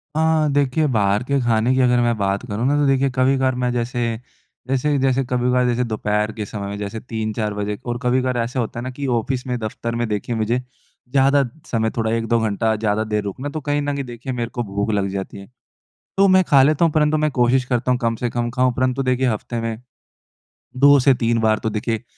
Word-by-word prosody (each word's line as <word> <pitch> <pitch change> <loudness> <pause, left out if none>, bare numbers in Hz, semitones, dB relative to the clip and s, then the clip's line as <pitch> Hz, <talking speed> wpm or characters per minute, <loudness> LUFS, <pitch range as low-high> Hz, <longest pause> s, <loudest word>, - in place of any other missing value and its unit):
हाँ। 160 -1 +2
देखिए, 145 +2 +2
बाहर 105 -3 +1
के 140 +2 0
खाने 120 +1 +2
की 130 - +1
अगर 125 -1 +3
मैं 120 -1 +2
बात 100 +2 -1
करूँ 110 +2 -2
ना, 145 - +2
तो 145 - +2
देखिए, 135 0 +2
कभी-कभार 130 0 +2
मैं 125 0 -1
जैसे, 120 -1 -2 0.5
जैसे 135 +3 +1
जैसे 135 0 +2
कभी-कभार 125 0 +1
जैसे 120 0 +1
दोपहर 105 -2 -1
के 105 - -3
समय 100 0 -6
में 100 +1 -5
जैसे 105 +2 -5
3-4 110 -2 -3
बजे 105 0 -3
और 120 -1 -2
कभी-कभार 125 0 +1
ऐसा 120 +2 -2
होता 115 0 -3
है - - -5
ना 130 - -4
कि 140 +2 -6
ऑफिस 125 +2 -2
में, 125 -1 -1
दफ़्तर 115 +1 -4
में 120 0 -1
देखिए, 105 +2 -3
मुझे 115 +2 0 0.5
ज़्यादा 140 +1 +4 0.3
समय 110 -2 +1
थोड़ा 110 -1 0
1-2 115 +1 +1
घंटा 110 0 0
ज़्यादा 105 0 0
देर 105 -1 -2
रुकना। 115 +8 -5
तो 155 +1 -5
कहीं 145 +1 -1
न 145 0 -2
कहीं 140 -1 -3
देखिए, 120 +2 -6
मेरे 120 -1 -3
को 120 - -3
भूख 100 0 -2
लग 100 -2 0
जाती 95 +1 -5
है, 100 0 -11 0.7
तो 195 0 +5
मैं 185 0 +5
खा 140 -2 +6
लेता 155 +4 +3
हूँ। 165 - +2
परंतु 150 0 +2
मैं 155 0 +1
कोशिश 125 0 +2
करता 125 0 -1
हूँ 125 - +2
कम 115 -1 +1
से 120 +1 -2
कम 120 0 -2
खाऊँ। 125 +1 +1
परंतु 130 +1 0
देखिए, 130 0 +1
हफ़्ते 115 +1 -3
में 115 -1 -4 1.0
2 140 +2 +7
से 135 +1 +5
3 115 -1 0
बार 110 -1 +2
तो 110 - -2
देखिए, 110 +2 -2
120 Hz, 225 wpm, -21 LUFS, 110-130 Hz, 1.0 s, 2